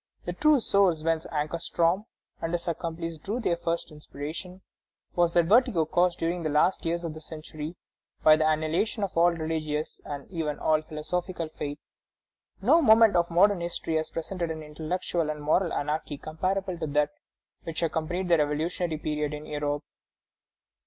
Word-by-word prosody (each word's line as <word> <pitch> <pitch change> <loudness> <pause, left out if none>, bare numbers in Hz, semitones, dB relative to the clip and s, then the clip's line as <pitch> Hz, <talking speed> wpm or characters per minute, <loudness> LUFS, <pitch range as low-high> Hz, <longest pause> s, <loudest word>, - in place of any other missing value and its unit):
The 175 - -2
true 300 +8 +4
source 195 -8 +3
whence 165 0 0
Ankarstroem 170 +4 0 0.4
and 165 - -2
his 175 0 -2
accomplices 165 -1 -3
drew 210 +9 -3
their 180 -8 +1
first 170 0 -2
inspiration 155 +5 -7 0.5
was 175 -1 +3
that 170 -1 +4
vertigo 215 -4 +4
caused 175 +2 +2
during 170 +1 -1
the 155 - -1
last 150 +5 +2
years 170 +1 -1
of 165 -2 -3
the 155 - -9
century 155 +1 -7 0.5
by 155 - +8
the 155 0 +2
annihilation 160 +8 0
of 195 - -3
all 170 +1 +6
religious 155 -2 -3
and 145 -1 -6
even 160 -4 -2
all 155 -1 +2
philosophical 165 +2 -4
faith.... 145 -2 -5 0.9
No 305 +10 +6
moment 220 - +6
of 170 0 +3
modern 180 +2 +4
history 170 -1 -3
has 155 0 -2
presented 170 +1 -3
an 160 -1 -5
intellectual 160 +2 -2
and 150 0 -3
moral 160 +4 +2
anarchy 150 0 -2
comparable 185 +4 -2
to 160 - -2
that 145 0 +1 0.5
which 165 0 -3
accompanied 165 +3 -1
the 170 -2 +5
revolutionary 155 +3 0
period 150 -1 -2
in 150 +1 -8
Europe." 145 0 -2
165 Hz, 160 wpm, -27 LUFS, 155-180 Hz, 0.9 s, by